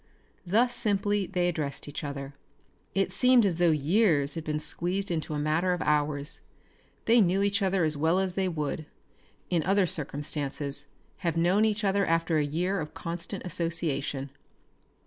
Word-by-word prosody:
Thus 235 Hz, +7 st, +3 dB
simply 205 Hz, -3 st, 0 dB
they 180 Hz, -2 st, 0 dB
addressed 155 Hz, -6 st, -3 dB
each 145 Hz, +2 st, -6 dB
other. 140 Hz, -1 st, -5 dB, 0.6 s
It 195 Hz, 0 st, +1 dB
seemed 250 Hz, -3 st, +5 dB
as 180 Hz, -4 st, 0 dB
though 175 Hz, -1 st, +5 dB
years 155 Hz, -1 st, +2 dB
had 165 Hz, -, -5 dB
been 150 Hz, -1 st, -2 dB
squeezed 180 Hz, +5 st, -2 dB
into 160 Hz, -2 st, -2 dB
a -, -, -1 dB
matter 155 Hz, +5 st, +1 dB
of 175 Hz, -, -3 dB
hours. 145 Hz, 0 st, 0 dB, 0.6 s
They 230 Hz, +1 st, +5 dB
knew 190 Hz, +1 st, +2 dB
each 200 Hz, +1 st, +1 dB
other 190 Hz, -2 st, +2 dB
as 155 Hz, -1 st, +1 dB
well 160 Hz, +5 st, +2 dB
as 190 Hz, -1 st, 0 dB
they 190 Hz, 0 st, 0 dB
would, 155 Hz, -2 st, -3 dB, 0.6 s
in 170 Hz, -2 st, +2 dB
other 195 Hz, +3 st, +3 dB
circumstances, 145 Hz, -2 st, -3 dB, 0.3 s
have 170 Hz, -3 st, -2 dB
known 180 Hz, +6 st, +3 dB
each 215 Hz, 0 st, 0 dB
other 200 Hz, 0 st, +2 dB
after 165 Hz, -2 st, +1 dB
a -, -, +2 dB
year 175 Hz, +7 st, -1 dB
of 150 Hz, -, -7 dB
constant 175 Hz, +4 st, -5 dB
association. 150 Hz, -5 st, -1 dB
170 Hz, 165 wpm, -28 LUFS, 150-195 Hz, 0.6 s, seemed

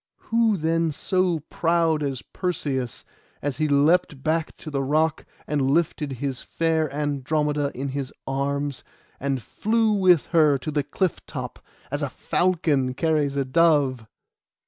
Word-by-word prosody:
Who 225 Hz, -2 st, +3 dB
then 165 Hz, 0 st, +1 dB
so 180 Hz, +1 st, 0 dB
proud 165 Hz, 0 st, +1 dB
as 135 Hz, -3 st, -3 dB
Perseus, 135 Hz, -, -3 dB, 0.3 s
as 140 Hz, -3 st, -3 dB
he 155 Hz, -, +1 dB
leapt 145 Hz, 0 st, +2 dB
back 160 Hz, 0 st, -1 dB
to 155 Hz, -, -8 dB
the 140 Hz, -1 st, -1 dB
rock, 155 Hz, +3 st, +1 dB, 0.2 s
and 150 Hz, -1 st, -1 dB
lifted 150 Hz, +1 st, +1 dB
his 130 Hz, 0 st, -3 dB
fair 160 Hz, -2 st, 0 dB
Andromeda 145 Hz, 0 st, -1 dB
in 135 Hz, +2 st, -3 dB
his 135 Hz, 0 st, -4 dB
arms, 140 Hz, 0 st, -2 dB, 0.4 s
and 135 Hz, -3 st, -2 dB
flew 220 Hz, 0 st, +1 dB
with 185 Hz, -6 st, +4 dB
her 155 Hz, -4 st, +5 dB
to 155 Hz, +4 st, -5 dB
the 145 Hz, -1 st, +1 dB
cliff 185 Hz, +5 st, -2 dB
top, -, -, -7 dB, 0.3 s
as -, -, -2 dB
a -, -, -1 dB
falcon 155 Hz, -8 st, +1 dB
carries 150 Hz, -2 st, +1 dB
a 140 Hz, -1 st, 0 dB
dove? 140 Hz, -5 st, +2 dB
150 Hz, 145 wpm, -24 LUFS, 140-165 Hz, 0.4 s, her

